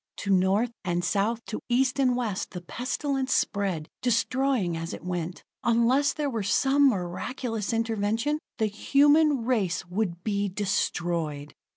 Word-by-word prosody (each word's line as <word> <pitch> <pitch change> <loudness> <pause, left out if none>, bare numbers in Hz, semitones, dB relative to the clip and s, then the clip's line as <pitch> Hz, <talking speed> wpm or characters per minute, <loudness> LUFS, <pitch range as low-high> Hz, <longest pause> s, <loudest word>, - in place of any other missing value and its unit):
To 200 - -2
North 195 +5 +3
and 175 -1 -1
South, 215 +5 0
to 215 - -4
East 255 +2 +2
and 255 -2 +3
West, 220 -6 -2
the 180 - -5
pestilence 265 - -2
spread, 190 -6 0
destroying 250 -5 +1
as 165 +1 -4
it - - -12
went. 175 -1 -4 0.2
Unless 240 +5 +3
there 300 -2 -2
were 230 -5 -2
some 275 +7 +4
miraculous 215 +3 -3
intervention, 225 +5 0 0.2
the 220 - +1
human 285 +5 +3
race 200 -9 0
would 180 -1 -3
be 205 -2 0
destroyed! 170 -6 -2
220 Hz, 140 wpm, -27 LUFS, 185-255 Hz, 0.2 s, some